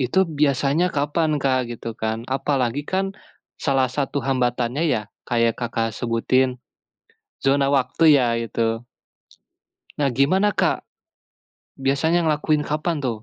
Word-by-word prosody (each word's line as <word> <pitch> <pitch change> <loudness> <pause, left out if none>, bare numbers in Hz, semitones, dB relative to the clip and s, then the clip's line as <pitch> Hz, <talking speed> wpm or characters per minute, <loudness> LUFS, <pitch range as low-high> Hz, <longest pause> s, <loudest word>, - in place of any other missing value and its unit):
Itu 135 +10 +2
biasanya 145 +3 +2
kapan, 150 +3 +1
Kak, 130 -1 +2
gitu 115 0 -6
kan, 110 +1 -3
apalagi 135 0 -1
kan, 195 +1 -1 0.5
salah 135 -2 +2
satu 140 0 -1
hambatannya 125 +1 0
ya, 105 - 0 0.3
kayak 115 -1 +2
Kakak, 115 -1 -1
sebutin, 125 +2 +1 0.9
zona 135 0 +3
waktu 135 +3 0
iya, 130 -4 +4 0.2
itu? 115 +1 -2 1.1
Nah 145 -1 +1
gimana 185 - +2
Kak? - - 0 0.9
biasanya 140 +6 +1
ngelakuin 150 0 +1
apaan 155 +2 -1
tuh? 130 - 0
135 Hz, 120 wpm, -22 LUFS, 120-150 Hz, 1.1 s, iya